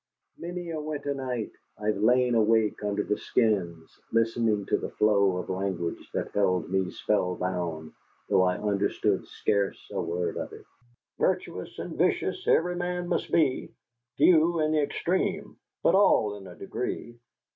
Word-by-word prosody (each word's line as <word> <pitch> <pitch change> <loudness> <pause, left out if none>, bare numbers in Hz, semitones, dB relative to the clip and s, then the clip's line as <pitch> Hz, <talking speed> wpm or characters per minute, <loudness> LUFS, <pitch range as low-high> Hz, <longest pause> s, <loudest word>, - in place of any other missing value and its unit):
Many 175 0 -5
a 155 -1 -3
winter 145 -2 -3
night 125 -5 -3 0.3
I 105 - -8
have 105 -1 +1
lain 125 +2 +4
awake 110 -2 +2
under 105 0 0
the 105 - -1
skins, 90 -8 0
listening 115 -2 +1
to - - 0
a - - -2
flow 100 -3 +3
of 90 - -5
language 95 -3 -3
that - - -2
held 90 -3 +1
me 95 -1 +1
spellbound, 90 -5 -2 0.3
though - - +4
I 90 0 +2
understood 100 -1 0
scarce 100 -2 0
a - - -1
word 85 0 -2
of - - -5
it. - - -12 0.5
"Virtuous - - -1
and - - -6
vicious - - 0
every 175 +2 +3
man 175 0 -2
must 175 - -1
be, 145 -6 +2 0.5
Few 170 -1 +5
in 155 0 +2
the 155 -1 +3
extreme, 190 +6 -1 0.3
but - - +4
all 110 - +4
in 100 -2 -10
a 90 - -11
degree." 120 0 -5
105 Hz, 155 wpm, -27 LUFS, 95-150 Hz, 0.5 s, Few